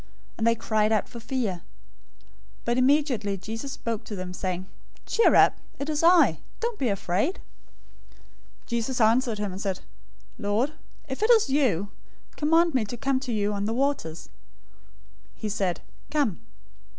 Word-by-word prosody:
and 225 - 0
they 230 - +4
cried 215 -1 +1
out 215 -2 +2
for 235 - -9
fear. 230 -6 -2 1.0
014:027 - - -30
But 240 +1 +1
immediately 255 -7 +2
Jesus 225 +8 -6
spoke 230 -3 -4
to 210 - -6
them, 185 -1 -5
saying 185 0 -3 0.4
"Cheer 455 - +4
up! - - +5 0.2
It 280 +2 -4
is 300 -1 0
I!{or, 335 - +7
I 355 -2 +7
AM!} - - -8 0.2
Don't 470 -1 -2
be 260 - +1
afraid." 200 - 0 1.3
014:028 235 -1 -1
Peter 255 -3 +1
answered 230 +1 +3
him 205 -2 -2
and 190 +2 -6
said, 195 -3 -2 0.6
"Lord, 225 +7 0 0.3
if 265 +4 -5
it 435 - +2
is 445 - +5
you, 205 - +1 0.4
command 325 +2 +3
me 255 -4 +2
to 240 +4 -6
come 270 +1 +1
to 260 -2 -5
you 210 -2 0
on 200 0 -2
the 225 +2 -1
waters." 260 - -1 1.1
014:029 - - -27
He 215 - -2
said, 195 -4 -1 0.3
"Come!" 285 - 0
230 Hz, 170 wpm, -26 LUFS, 205-275 Hz, 1.3 s, I!{or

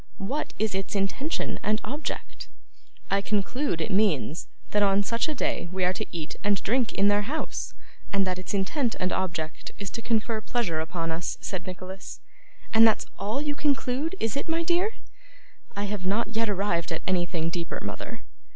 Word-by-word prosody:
What 265 +10 -2
is 215 -1 +1
its 195 +2 -2
intention 205 - 0
and 215 +1 +2
object?' 295 +4 -4 0.6
'I 195 0 +4
conclude 205 - 0
it - - -1
means, 190 -6 +2 0.2
that 210 - +3
on 200 0 +5
such 230 +9 +1
a 305 - -1
day 175 -8 0
we 185 0 0
are 180 - +3
to - - -3
eat 160 -2 -4
and 205 -1 +4
drink 240 0 +2
in 200 +1 +4
their 205 0 +5
house, 290 +10 -3 0.4
and 195 -1 +3
that 185 -1 -1
its 185 +2 -3
intent 230 +6 +1
and 185 - +1
object 165 -4 -2
is 200 -2 -4
to 230 - -4
confer 225 -1 +1
pleasure 215 -9 0
upon 165 +1 -2
us,' 165 +1 -2
said 185 -2 -4
Nicholas. 185 +1 -6 0.5
'And 225 0 +9
that's 220 - +3
all 215 +8 0
you 295 -1 0
conclude 285 +2 +1
it 225 +3 0
is, 280 - -1
my 330 +1 +1
dear?' 360 +6 +2 0.8
'I 200 - -1
have 205 -2 -2
not 210 +3 +2
yet 225 0 +1
arrived 190 -4 +1
at 165 - -2
anything 175 -3 +1
deeper, 170 0 -2
mother. - - -5
205 Hz, 180 wpm, -28 LUFS, 185-235 Hz, 0.8 s, And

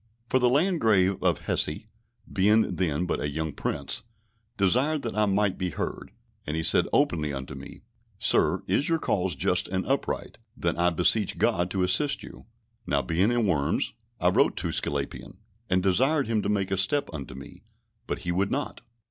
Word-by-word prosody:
For 130 - +3
the 125 -1 +3
Landgrave 115 - +2
of 90 -5 +1
Hesse 75 +7 -1 0.5
(being 105 0 +3
then 85 -2 0
but - - -2
a 75 - -2
young 80 +1 -3
Prince) - - -3 0.6
desired 130 +10 +2
that 115 -3 -4
I 105 -1 +2
might 100 -1 0
be 90 -1 -1
heard, 75 - -5 0.4
and 75 +2 -2
he 80 - -1
said - - +4
openly 75 -4 +1
unto 65 -1 -6
me, 70 +7 -11 0.3
"Sir, - - +2
is 145 - +2
your 165 - +2
cause 95 - -1
just 90 +7 +1
and 95 0 -2
upright, 135 -3 -2 0.2
then 85 -1 -1
I 85 +1 +3
beseech 90 +5 +2
God 95 -6 +1
to 95 0 -1
assist 140 +11 +3
you." - - -12 0.4
Now 70 -1 +1
being 90 +7 +1
in 120 -2 +1
Worms, 75 -7 0 0.3
I - - +3
wrote - - +2
to - - -1
Sglapian, 70 -1 -2 0.3
and 90 -1 +2
desired 135 - +2
him 110 -2 0
to - - -3
make 100 -2 -1
a 95 - 0
step 140 +10 +2
unto 70 -3 -7
me, 70 - -12 0.5
but - - -2
he 85 - 0
would 95 +3 0
not. 145 +2 -3
95 Hz, 180 wpm, -26 LUFS, 85-115 Hz, 0.6 s, said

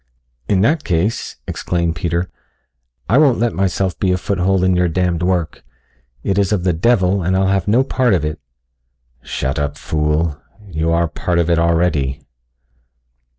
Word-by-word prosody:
"In 95 -2 +3
that 145 +8 +2
case," 95 +6 -1
exclaimed 85 -2 -1
Peter, 85 +2 -1 0.8
"I 115 +8 +4
won't 140 -6 +4
let 120 +1 0
myself 95 -1 -1
be 95 - +1
a 90 - +2
foothold 95 0 0
for - - +2
your 90 -1 +2
damned 90 0 0
work 90 -3 -1 0.6
it 100 0 0
is 100 0 +1
of 100 -4 0
the 90 -1 +2
devil 95 +1 +2
and 95 +2 +1
I'll 95 0 +2
have 95 -3 0
no 115 +6 +4
part 130 -5 +1
of 80 -4 -1
it." 75 0 -4 0.8
"Shut 65 +2 -3
up, 70 0 -2
fool. 75 0 -1 0.3
You 80 -2 -1
are 85 +1 +2
a - - 0
part 85 +3 -2
of 85 0 +2
it 85 - +3
already." 80 -5 +1
90 Hz, 170 wpm, -18 LUFS, 80-95 Hz, 0.8 s, I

